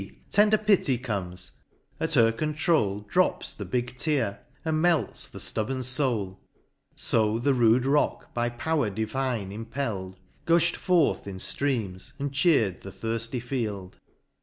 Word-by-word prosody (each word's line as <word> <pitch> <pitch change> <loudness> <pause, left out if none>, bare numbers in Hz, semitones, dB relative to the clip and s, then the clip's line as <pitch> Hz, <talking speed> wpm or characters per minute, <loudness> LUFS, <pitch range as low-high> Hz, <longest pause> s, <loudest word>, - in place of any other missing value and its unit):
tender 210 +1 +5
Pity 200 - +2
comes 100 -7 -4 0.2
;— - - -38
at - - -1
her 115 0 +5
controul, 150 - 0
Drops 105 - 0
the - - -7
big 125 0 -2
tear, 130 -9 0 0.3
and 155 -1 +1
melts 165 -9 +1
the - - -12
flubborn 130 +4 -1
foul; 120 -8 -1 0.6
So 110 -1 +2
the 135 +4 +2
rude 120 0 +4
rock 145 +2 0
by 120 0 0
power 135 +1 -1
divine 110 0 -2
impelFd, 110 -4 -4 0.3
Gufli'd 170 0 +4
forth 175 - +2
in 95 -1 -6
ftreams, 105 -5 0
and 140 0 -3
cheer'd 140 - +2
the 95 - -8
thirfty 115 +5 -2
field. 110 -7 -4
120 Hz, 135 wpm, -27 LUFS, 105-145 Hz, 0.6 s, tender